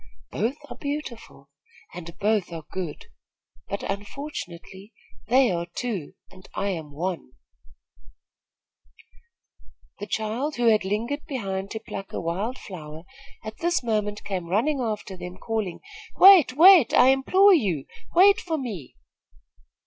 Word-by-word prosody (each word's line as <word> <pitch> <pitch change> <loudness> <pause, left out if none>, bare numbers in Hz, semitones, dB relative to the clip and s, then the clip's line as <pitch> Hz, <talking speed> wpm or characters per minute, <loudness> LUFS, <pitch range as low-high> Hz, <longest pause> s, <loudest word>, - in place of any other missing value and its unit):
Both 240 +5 -1
are - - -9
beautiful, 250 - -7 0.4
and 170 -1 -9
both 210 -4 0
are 165 -2 -7
good; 180 -5 -5 0.6
but, 200 - -4
unfortunately, 200 - -7 0.3
they 250 0 +4
are 170 -1 -2
two, 215 -11 -4 0.2
and 185 0 -16
I 200 - -1
am 160 -6 -5
one." 165 -3 -4 2.7
The 205 - -6
child, 225 +9 -2
who 240 -1 +3
had 215 -2 +3
lingered 230 +9 -3
behind 195 -7 -4
to 220 - -5
pluck 195 -3 -8
a - - -2
wild 195 +10 -3
flower, 160 -4 -9 0.4
at 215 0 -8
this 345 -4 0
moment 210 -2 -2
came 185 -4 -4
running 245 - +1
after 215 -5 -3
them, 180 0 -8
calling: 215 -3 -3 0.3
"Wait! 370 -9 +8
wait! 355 - +8
I 255 - +7
implore 375 +10 +5
you, 185 - +1 0.3
wait 390 +3 +6
for 325 -3 -3
me!" 210 - -6
210 Hz, 130 wpm, -25 LUFS, 180-265 Hz, 2.7 s, Wait